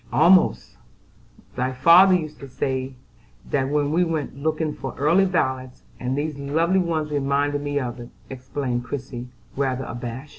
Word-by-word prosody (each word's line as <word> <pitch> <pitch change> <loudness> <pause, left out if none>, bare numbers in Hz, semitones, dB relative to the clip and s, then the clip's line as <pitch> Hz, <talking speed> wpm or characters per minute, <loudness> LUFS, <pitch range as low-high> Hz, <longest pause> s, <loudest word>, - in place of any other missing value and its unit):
"Almost; 155 - +3 0.8
my 130 +1 -1
father 170 +8 +7
used 155 -4 -4
to 140 - -9
say 130 0 -3 0.6
that 135 -1 +1
when 145 0 0
we 175 +3 +3
went 160 -6 -3
looking 155 +2 -1
for - - -7
early 165 +7 +4
violets, 130 -8 -2 0.2
and 130 +2 -2
these 150 -1 -3
lovely 165 +7 +1
ones 160 -4 -1
reminded 145 0 0
me 145 0 -1
of 125 -2 -5
it," 120 0 -9 0.2
explained 130 -1 -4
Christie, 125 -1 -6 0.3
rather 130 -2 -1
abashed. 120 +4 -6
140 Hz, 150 wpm, -23 LUFS, 130-155 Hz, 0.8 s, father